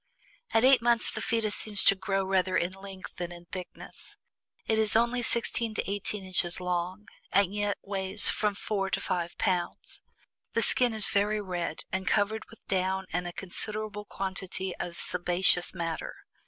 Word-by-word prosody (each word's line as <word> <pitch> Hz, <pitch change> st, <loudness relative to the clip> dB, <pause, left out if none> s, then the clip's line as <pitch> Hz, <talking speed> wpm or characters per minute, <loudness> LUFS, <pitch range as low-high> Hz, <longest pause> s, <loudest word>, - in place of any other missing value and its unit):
"At 225 Hz, -, +3 dB
EIGHT 260 Hz, -2 st, +6 dB
MONTHS, 235 Hz, -1 st, +5 dB
the -, -, -5 dB
fetus 225 Hz, -2 st, 0 dB
seems 210 Hz, -2 st, +2 dB
to -, -, +6 dB
grow 195 Hz, 0 st, -1 dB
rather 185 Hz, -1 st, +1 dB
in 175 Hz, -, 0 dB
length 195 Hz, -1 st, -9 dB
than 175 Hz, -1 st, -4 dB
in 175 Hz, 0 st, -11 dB
thickness; 180 Hz, +1 st, -9 dB, 0.5 s
it 220 Hz, 0 st, +1 dB
is 220 Hz, -1 st, +1 dB
only 235 Hz, +2 st, +2 dB
sixteen 235 Hz, -1 st, 0 dB
to -, -, -2 dB
eighteen 200 Hz, 0 st, -3 dB
inches 180 Hz, -2 st, +2 dB
long, 180 Hz, +3 st, -3 dB, 0.2 s
and 200 Hz, -1 st, +3 dB
yet 205 Hz, -1 st, -1 dB
weighs 195 Hz, 0 st, +2 dB
from 210 Hz, -2 st, +2 dB
four 195 Hz, -1 st, -2 dB
to -, -, 0 dB
five 175 Hz, -1 st, -3 dB
pounds. 180 Hz, -4 st, -2 dB, 0.5 s
The -, -, +1 dB
skin 245 Hz, -3 st, +3 dB
is 215 Hz, -2 st, +4 dB
very 210 Hz, 0 st, +1 dB
red, 180 Hz, -5 st, -4 dB
and 190 Hz, +1 st, -2 dB
covered 215 Hz, +1 st, +1 dB
with 225 Hz, -, -17 dB
down 190 Hz, 0 st, 0 dB
and 180 Hz, +1 st, -1 dB
a -, -, -4 dB
considerable 210 Hz, +3 st, -1 dB
quantity 190 Hz, -1 st, -4 dB
of 170 Hz, -1 st, -5 dB
sebaceous 175 Hz, 0 st, +2 dB
matter. 165 Hz, -3 st, -4 dB
195 Hz, 170 wpm, -29 LUFS, 180-215 Hz, 0.5 s, EIGHT